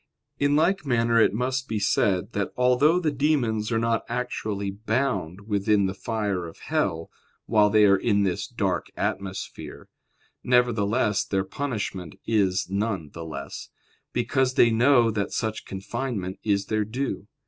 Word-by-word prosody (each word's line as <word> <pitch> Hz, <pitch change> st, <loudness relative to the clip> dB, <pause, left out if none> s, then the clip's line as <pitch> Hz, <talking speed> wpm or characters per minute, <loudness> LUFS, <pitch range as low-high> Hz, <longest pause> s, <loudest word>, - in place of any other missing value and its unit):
In 145 Hz, 0 st, +3 dB
like 175 Hz, +5 st, +2 dB
manner 115 Hz, -3 st, +2 dB
it -, -, +5 dB
must 130 Hz, +4 st, -2 dB
be 110 Hz, -, -2 dB
said, 100 Hz, -2 st, +1 dB
that 100 Hz, -1 st, -1 dB
although 125 Hz, +7 st, +4 dB
the 160 Hz, -4 st, 0 dB
demons 125 Hz, -7 st, 0 dB
are 115 Hz, -, +2 dB
not 115 Hz, 0 st, +1 dB
actually 110 Hz, -5 st, -3 dB
bound 110 Hz, -4 st, -2 dB
within 105 Hz, 0 st, +1 dB
the 95 Hz, -, -1 dB
fire 100 Hz, -4 st, -2 dB
of 80 Hz, -, -12 dB
hell 80 Hz, 0 st, -2 dB, 0.3 s
while 105 Hz, -2 st, +4 dB
they 105 Hz, 0 st, +5 dB
are 100 Hz, -1 st, +5 dB
in 100 Hz, -2 st, +2 dB
this 95 Hz, -3 st, -1 dB
dark -, -, -1 dB
atmosphere, 95 Hz, -1 st, -5 dB, 0.5 s
nevertheless 115 Hz, -3 st, +2 dB
their 95 Hz, -1 st, -1 dB
punishment 100 Hz, -, -4 dB
is 95 Hz, -4 st, +1 dB
none 100 Hz, -5 st, -2 dB
the 85 Hz, -, -7 dB
less; 80 Hz, -, -7 dB, 0.4 s
because 130 Hz, -1 st, 0 dB
they 120 Hz, -, +5 dB
know 120 Hz, 0 st, +4 dB
that 100 Hz, -2 st, -2 dB
such 110 Hz, -1 st, -2 dB
confinement 95 Hz, 0 st, -4 dB
is 100 Hz, -2 st, +1 dB
their 110 Hz, -1 st, 0 dB
due. 115 Hz, -1 st, -4 dB
110 Hz, 150 wpm, -25 LUFS, 100-125 Hz, 0.5 s, it